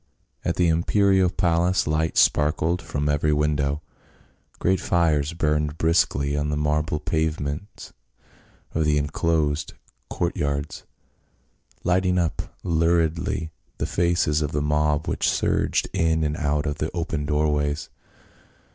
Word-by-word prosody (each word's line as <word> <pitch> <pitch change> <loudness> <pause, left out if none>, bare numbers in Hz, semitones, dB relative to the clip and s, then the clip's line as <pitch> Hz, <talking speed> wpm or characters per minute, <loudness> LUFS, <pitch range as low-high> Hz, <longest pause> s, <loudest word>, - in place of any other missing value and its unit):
At 85 - -1
the 90 - +2
imperial 95 +3 +3
palace 90 0 +1
lights 80 +1 +2
sparkled 80 +4 +2
from 75 0 -3
eveiy 75 +1 +1
window. 75 0 0 0.7
Great 95 0 +1
fires 80 -3 +1
burned 75 -2 0
briskly 70 -4 +1
on 75 0 -1
the 75 - -1
marble 75 +1 0
pavements 80 +3 -3 0.8
of 80 - +1
the 75 -1 +2
inclosed 75 +1 0 0.3
court 85 0 -2
yards, 70 +1 -3 1.0
lighting 90 +1 +2
up 85 -3 0 0.2
luridly 85 +1 0 0.3
the - - -1
faces 85 -3 +1
of 75 0 -2
the 75 - 0
mob 75 0 +1
which - - +1
surged - - +1
in 80 -1 +1
and 75 0 -1
out 75 0 -1
of 75 -1 -3
the 75 - -1
open 80 -4 -2
doorways. 75 -1 0
75 Hz, 125 wpm, -24 LUFS, 75-85 Hz, 1.0 s, imperial